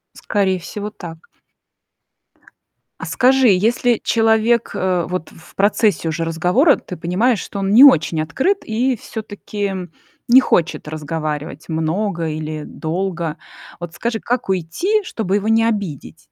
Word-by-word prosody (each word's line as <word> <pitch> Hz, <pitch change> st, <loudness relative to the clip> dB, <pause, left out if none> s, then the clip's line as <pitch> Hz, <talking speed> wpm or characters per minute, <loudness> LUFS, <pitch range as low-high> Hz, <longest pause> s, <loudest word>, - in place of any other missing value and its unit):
Скорее 190 Hz, -3 st, 0 dB
всего, 205 Hz, +4 st, -6 dB
так. 170 Hz, -5 st, -11 dB, 1.7 s
А -, -, -6 dB
скажи, 260 Hz, 0 st, +3 dB
если 225 Hz, +4 st, +2 dB
человек, 225 Hz, +1 st, +2 dB
э, 180 Hz, -2 st, 0 dB
вот 180 Hz, -3 st, -4 dB
в 165 Hz, -, -18 dB
процессе 200 Hz, -4 st, +2 dB
уже 165 Hz, +1 st, -2 dB
разговора 180 Hz, -, +3 dB
ты 180 Hz, -, -9 dB
понимаешь, 200 Hz, +8 st, +1 dB
что 200 Hz, -, -6 dB
он 195 Hz, 0 st, -1 dB
не 255 Hz, +5 st, +9 dB
очень 160 Hz, -, +5 dB
открыт 265 Hz, -, 0 dB
и 245 Hz, +4 st, 0 dB
всё-таки 205 Hz, -2 st, -5 dB, 0.5 s
не 250 Hz, +2 st, +8 dB
хочет 170 Hz, -10 st, 0 dB
разговаривать 155 Hz, -1 st, -5 dB
много 165 Hz, +2 st, -1 dB
или 155 Hz, 0 st, -5 dB
долго. 170 Hz, -1 st, -4 dB, 0.4 s
Вот 170 Hz, -1 st, -7 dB
скажи, 230 Hz, -1 st, -3 dB
как 245 Hz, -3 st, -2 dB
уйти, 265 Hz, -, 0 dB
чтобы 200 Hz, -, -2 dB
его 205 Hz, +1 st, -1 dB
не 225 Hz, 0 st, +4 dB
обидеть? 200 Hz, -, -4 dB
195 Hz, 130 wpm, -19 LUFS, 165-225 Hz, 1.7 s, не